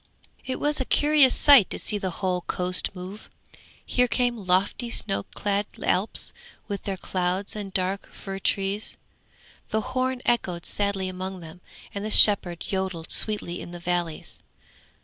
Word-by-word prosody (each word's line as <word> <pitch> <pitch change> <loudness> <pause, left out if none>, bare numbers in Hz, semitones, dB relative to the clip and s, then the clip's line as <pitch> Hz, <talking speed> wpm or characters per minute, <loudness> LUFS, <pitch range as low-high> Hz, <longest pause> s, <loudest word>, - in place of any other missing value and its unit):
It 260 -1 -4
was 295 -1 +1
a - - -2
curious 295 -2 +5
sight 280 -9 +7
to - - -4
see 210 - +1
the 190 - -2 0.2
whole 180 -1 0
coast 180 0 +2
move. 185 +3 -9 0.6
Here 250 0 +2
came 245 0 +1
lofty 195 +6 +1
snow 205 -4 -1
clad 205 0 -1 0.2
Alps, 190 +5 -1 0.3
with 200 -2 -5
their 195 -1 -3
clouds 185 +2 -2
and 205 -2 -6
dark 190 +1 -1
fir 195 -1 -7
trees. 195 +2 -1 0.7
The 220 - 0
horn 255 0 -1
echoed 180 -8 0
sadly 200 -2 -1
among 185 0 -6
them, 165 +2 -12 0.3
and 200 - -5
the 215 - -3
shepherd 190 -6 +5
yodelled 190 -4 -3
sweetly 205 -5 +2
in 175 - -9
the 175 - -7
valleys. 170 -2 -3
195 Hz, 150 wpm, -25 LUFS, 180-215 Hz, 0.7 s, sight